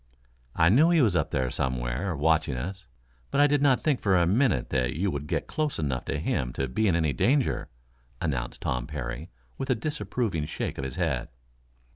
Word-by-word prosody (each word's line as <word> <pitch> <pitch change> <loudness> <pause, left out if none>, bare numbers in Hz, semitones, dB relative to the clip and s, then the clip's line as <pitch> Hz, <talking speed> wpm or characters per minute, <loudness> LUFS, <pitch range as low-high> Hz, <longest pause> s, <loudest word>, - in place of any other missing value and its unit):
"I 85 -1 +5
knew 145 - +5
he 170 -1 +4
was 110 -10 +3
up 80 - +1
there 65 -1 -1
somewhere, 65 +7 -2
watching 80 -3 +2
us, 95 +8 -6 0.4
but - - 0
I 145 - +7
did 145 -1 +2
not 135 -3 +4
think 145 -5 +1
for 95 -3 +3
a 85 - +4
minute 95 - +2
that 65 -3 0
you 95 +4 0
would 70 0 -4
get - - -1
close 155 -2 -2
enough 65 -5 -2
to 70 - -2
him 65 -4 -1
to 70 - -2
be 110 - 0
in 90 - +3
any 80 -4 +1
danger," 130 - +1 0.5
announced 65 -7 -3
Tom 60 -1 -1
Parry, 65 -5 -5 0.3
with 135 - -3
a 130 - +3
disapproving 115 - -2
shake - - -4
of - - -3
his 65 -1 -4
head. 75 -9 -1
80 Hz, 200 wpm, -27 LUFS, -, 0.5 s, I